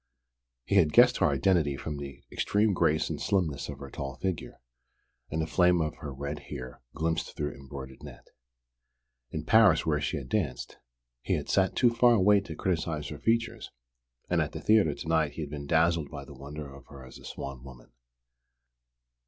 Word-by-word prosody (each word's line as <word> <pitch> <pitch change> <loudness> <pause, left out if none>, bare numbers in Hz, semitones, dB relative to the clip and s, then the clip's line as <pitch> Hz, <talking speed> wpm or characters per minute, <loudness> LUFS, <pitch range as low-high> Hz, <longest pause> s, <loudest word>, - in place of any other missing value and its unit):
He 100 - +2
had 80 -6 +4
guessed 125 +1 +6
her 90 - +3
identity 75 -1 +2
from 75 0 -5
the 70 -1 -8
extreme 105 0 +1
grace 80 -3 +2
and - - -4
slimness 90 -10 0
of 70 - -6
her 70 -1 -9
tall 70 -1 -5
figure, 95 0 -4 0.7
and 80 - -2
the - - -1
flame 90 +1 +3
of 75 -1 -2
her 70 - -7
red 70 +2 -5
hair 65 0 -7
glimpsed 80 +2 -2
through 75 -1 -3
embroidered 65 -1 -10
net. - - -11 1.0
In 80 +3 -5
Paris, 105 -6 +5
where 75 -2 +1
she 65 - -1
had 65 -3 -6
danced, 75 - -2 0.4
he - - 0
had - - -4
sat 95 -1 +2
too 120 -2 +4
far 120 +1 +5
away 100 0 +5
to 100 - -8
criticise 80 -5 -2
her 75 - -7
features, 115 0 0 0.6
and - - +2
at - - -3
the - - -5
theatre 105 -9 +3
to - - -8
night 80 -3 +2
he'd 75 -2 -6
been 70 -1 -6
dazzled 80 -1 +2
by 70 -2 -8
the 70 - -11
wonder 70 +2 -8
of 70 -3 -14
her 70 -2 -12
as 65 - -12
a - - -16
swan 70 -2 -7
woman. 60 -3 -13
75 Hz, 185 wpm, -29 LUFS, 70-95 Hz, 1.0 s, guessed